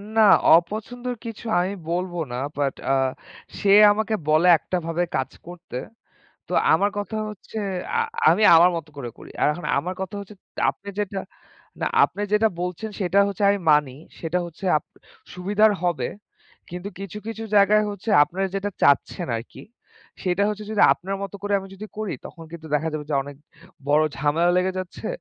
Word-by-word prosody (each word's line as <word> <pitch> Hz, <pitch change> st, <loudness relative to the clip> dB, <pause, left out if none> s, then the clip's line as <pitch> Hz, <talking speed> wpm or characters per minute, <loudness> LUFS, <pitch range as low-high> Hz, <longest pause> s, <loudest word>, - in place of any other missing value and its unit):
না, 220 Hz, -, +5 dB, 0.3 s
অপছন্দর 225 Hz, +8 st, -2 dB
কিছু 230 Hz, 0 st, -7 dB
আমি 185 Hz, +3 st, -1 dB, 0.2 s
বলব 180 Hz, +1 st, -2 dB, 0.2 s
না। -, -, -4 dB, 0.2 s
বাট 140 Hz, -2 st, 0 dB, 0.2 s
আ -, -, +4 dB, 0.7 s
সে 200 Hz, -, 0 dB, 0.2 s
আমাকে 220 Hz, +1 st, -1 dB
বলে 155 Hz, +4 st, +4 dB
একটাভাবে 170 Hz, 0 st, -2 dB
কাজ 130 Hz, -, -1 dB, 0.2 s
করতে। 175 Hz, -7 st, -8 dB, 0.7 s
তো -, -, -8 dB, 0.2 s
আমার 205 Hz, +1 st, +3 dB
কথা 205 Hz, +2 st, -4 dB
হচ্ছে, 210 Hz, +1 st, -11 dB, 0.4 s
আ -, -, +2 dB, 0.3 s
আমি 215 Hz, -, +4 dB
আমার 175 Hz, +2 st, +7 dB
মতো 160 Hz, -2 st, -6 dB
করে 120 Hz, -4 st, -6 dB
করি। -, -, -12 dB
আর -, -, +4 dB
এখন 175 Hz, -, -7 dB
আমার 180 Hz, +5 st, -3 dB
কথা 190 Hz, +1 st, -5 dB
হচ্ছে, 200 Hz, +1 st, -11 dB, 0.4 s
আপনি 200 Hz, -, -14 dB
যেটা 200 Hz, -1 st, -2 dB, 0.6 s
না, -, -, -1 dB, 0.2 s
আপনি 205 Hz, -, +1 dB
যেটা 220 Hz, +1 st, +4 dB
বলছেন, 180 Hz, +5 st, -4 dB
সেটা 190 Hz, +1 st, +1 dB
হচ্ছে 200 Hz, +1 st, -5 dB
আমি 200 Hz, -, +1 dB
মানি। 150 Hz, -3 st, +3 dB, 0.3 s
সেটা 165 Hz, +2 st, -1 dB
হচ্ছে 170 Hz, +3 st, -11 dB
আপ 150 Hz, -, -3 dB, 0.5 s
সুবিধার 205 Hz, +4 st, +3 dB
হবে। 165 Hz, -9 st, 0 dB, 0.6 s
কিন্তু 180 Hz, +3 st, -6 dB
কিছু, 195 Hz, +1 st, -7 dB
কিছু 225 Hz, 0 st, -5 dB
জায়গায় 210 Hz, +1 st, +5 dB
হচ্ছে, 205 Hz, +2 st, -5 dB
আপনারা 185 Hz, +5 st, -1 dB
যেটা 200 Hz, +1 st, -2 dB
চাচ্ছেন 140 Hz, -, +2 dB
আরকি, 115 Hz, -, -9 dB, 0.6 s
সেটা 185 Hz, +1 st, 0 dB
হচ্ছে 210 Hz, 0 st, -4 dB
যদি 210 Hz, -1 st, +2 dB
আপনার 195 Hz, +2 st, -5 dB
মতো 200 Hz, 0 st, -6 dB
করে 205 Hz, 0 st, -2 dB, 0.2 s
যদি 205 Hz, +2 st, -8 dB
আমি -, -, -25 dB
করি, 215 Hz, -4 st, -3 dB
তখন 165 Hz, -, -12 dB
কিন্তু 160 Hz, -1 st, -9 dB
দেখা 160 Hz, +2 st, +1 dB
যাবে 150 Hz, -1 st, -4 dB
যে -, -, +1 dB
অনেক 140 Hz, 0 st, -10 dB, 0.5 s
বড় 150 Hz, +2 st, +4 dB
ঝামেলা 155 Hz, +5 st, +2 dB
লেগে 185 Hz, +1 st, +1 dB
যাচ্ছে। 185 Hz, -1 st, -7 dB
185 Hz, 170 wpm, -23 LUFS, 165-205 Hz, 0.7 s, আমার